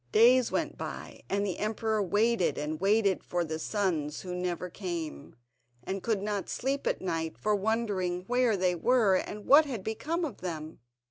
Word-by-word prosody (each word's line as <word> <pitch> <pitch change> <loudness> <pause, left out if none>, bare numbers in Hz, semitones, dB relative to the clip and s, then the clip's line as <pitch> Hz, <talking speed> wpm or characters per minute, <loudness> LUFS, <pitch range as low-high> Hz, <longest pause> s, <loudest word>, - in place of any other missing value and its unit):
Days 245 +2 +5
went 315 -1 -2
by, - - -7
and 200 +1 0
the 190 - -3
emperor 215 0 0
waited 205 +1 +2
and 155 +2 -3
waited 200 -1 +3
for 175 -1 -1
the 160 0 -4
sons 160 -7 -1
who 180 -1 -6
never 180 0 -2
came, 170 -6 -6 0.5
and 190 +7 -3
could 210 -2 -1
not 205 -2 -2
sleep 275 +2 -2
at - - 0
night 165 -3 -2
for 210 - 0
wondering 200 -4 -1
where 245 -2 +2
they 180 -1 +2
were 220 +3 +3
and 205 +2 -2
what 300 +3 +7
had 240 -9 -5
become 305 - -2
of 290 - -6
them. 160 -3 -5
200 Hz, 175 wpm, -29 LUFS, 180-225 Hz, 0.5 s, what